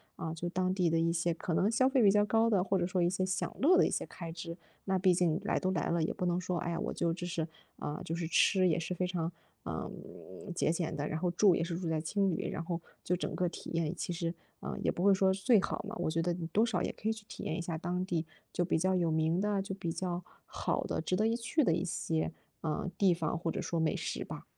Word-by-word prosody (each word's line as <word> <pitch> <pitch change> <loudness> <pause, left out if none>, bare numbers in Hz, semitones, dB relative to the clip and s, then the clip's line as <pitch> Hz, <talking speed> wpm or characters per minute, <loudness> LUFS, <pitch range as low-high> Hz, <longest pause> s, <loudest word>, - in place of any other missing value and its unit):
啊， 160 - -4
就 170 +1 -4
当 185 +1 0
地 180 -3 +2
的 165 - +2
一 165 0 +2
些 170 0 +1
可 165 +1 -3
能 195 +5 +3
消 260 +3 +4
费 265 -2 +3
比 205 - +7
较 205 +1 +5
高 225 +2 +3
的， 195 -4 +3
或 195 0 +1
者 175 - +1
说 185 -1 0
一 170 - +4
些 185 +1 0
享 185 0 -2
乐 330 +7 +6
的 - - +6
一 - - -2
些 - - -1
开 170 -2 -7
支。 170 0 -6 0.3
那 190 -1 +2
毕 185 0 +4
竟 170 -2 +2
来 - - +1
都 185 - 0
来 175 -5 0
了， 170 0 +2
也 160 - +1
不 180 - -2
能 175 0 +1
说， 180 -1 -1
哎 170 - -2
呀， 165 - -2
我 - - -2
就 170 -1 0
只 175 +1 -5
是， 170 -2 -1 0.3
啊， 150 - -4
就 165 - -2
是 170 0 -2
吃 185 +3 +4
也 165 0 +2
是 170 +2 -3
非 180 +1 0
常， 175 -2 -2 0.3
啊， - - -3 0.7
节 - - +2
俭 170 -1 -1
的。 145 +1 -2
然 155 - -2
后 180 +1 +1
住 190 +1 +5
也 - - 0
是 170 0 -3
住 175 -2 -3
在 160 -1 +1
青 195 +3 +1
旅， - - -2
然 165 - -3
后 170 0 -2 0.2
就 180 - +1
整 180 - -3
个 180 - +1
体 - - -8
验 165 0 0
其 175 - -3
实， 170 -1 -2 0.3
呃， - - -4
也 - - +1
不 175 - -3
会 200 0 +7
说 190 0 +4
最 200 +2 +4
好 - - -3
嘛， 220 - -5
我 - - 0
觉 165 +1 0
得 175 +1 +1
你 170 -1 -4
多 210 +7 +3
少 230 - 0
也 - - 0
可 215 - -6
以 - - +2
去 220 -1 -11
体 - - -7
验 155 - -2
一 175 - -2
下 165 -1 -3
当 175 +2 -2
地 170 -3 -1 0.3
就 175 - 0
比 160 - +1
较 185 +2 +2
有 170 -3 +2
名 160 +2 +2
的、 205 -1 +1
就 195 0 -4
比 175 -4 -3
较 175 0 -3 0.2
好 - - -1
的、 - - -2
值 185 - 0
得 215 +3 +2
一 230 - +2
去 240 +6 +1
的 170 - +3
一 170 +3 0
些， 165 -2 -1 0.3
呃， 160 +3 -1
地 195 -3 +5
方， 165 -1 -1
或 165 0 -1
者 - - -3
说 170 - -1
美 160 - +2
食 - - -3
吧。 - - -7
175 Hz, 305 characters per minute, -32 LUFS, 165-190 Hz, 0.7 s, 比